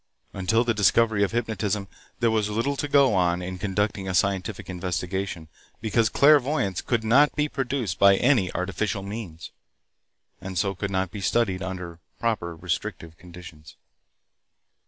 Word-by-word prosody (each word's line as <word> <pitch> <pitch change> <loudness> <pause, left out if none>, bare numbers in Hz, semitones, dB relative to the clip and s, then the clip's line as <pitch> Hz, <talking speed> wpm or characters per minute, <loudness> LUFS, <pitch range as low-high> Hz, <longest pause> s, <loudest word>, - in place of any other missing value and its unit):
Until 110 +5 +1
the 120 -1 +1
discovery 110 0 +3
of 100 - 0
hypnotism 110 -3 -2 0.3
there 115 -1 +3
was 110 -2 0
little 115 +7 -1
to 145 - -3
go 140 -4 +4
on 90 -1 +1
in 90 0 -6
conducting 100 0 -1
a 95 - -2
scientific 95 +2 -1
investigation, 90 -1 -4 0.3
because 110 0 +1
clairvoyance 140 - +3
could 120 -3 -1
not 135 +7 +4
be 150 0 +1
produced 130 - -3
by 100 0 +7
any 120 -4 +2
artificial 100 +2 -2
means, 100 -6 -7 0.9
and 95 -1 -6
so 100 +3 +1
could 100 +2 -4
not 95 -2 -1
be 100 - -7
studied 95 -2 +1
under 90 -3 -6 0.2
proper 100 -8 -2
restrictive 80 0 -4
conditions. 85 -4 -13
100 Hz, 145 wpm, -25 LUFS, 90-115 Hz, 0.9 s, by